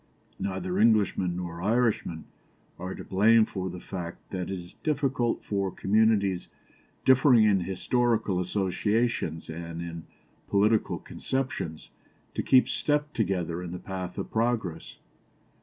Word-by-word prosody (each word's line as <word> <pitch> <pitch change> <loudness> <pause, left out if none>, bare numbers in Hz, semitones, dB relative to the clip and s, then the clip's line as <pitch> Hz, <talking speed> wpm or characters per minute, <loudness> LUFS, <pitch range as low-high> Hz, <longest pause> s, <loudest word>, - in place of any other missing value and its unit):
Neither 95 -1 -2
Englishmen 105 -5 +3
nor 85 -1 -5
Irishmen 105 -6 +1 0.6
are 90 +1 -5
to - - -8
blame 110 +4 +5
for 95 -3 -4
the 90 0 -7
fact 85 -2 -7
that 90 -2 -3
it 95 -1 -3
is 90 0 -11
difficult 135 -5 0
for 100 -2 -1
communities 100 -2 +2 0.6
differing 130 -3 +6
in 105 -3 +4
historical 105 +2 0
associations 95 -1 0
and 85 +1 -6
in 85 -1 -6 0.4
political 105 +2 +2
conceptions 130 -12 -4 0.4
to - - -1
keep 130 -1 +5
step 150 0 0
together 90 -5 -1
in 90 -1 -6
the - - -4
path 90 -1 -6
of - - -4
progress. 115 -7 -1
95 Hz, 125 wpm, -28 LUFS, 90-115 Hz, 0.6 s, differing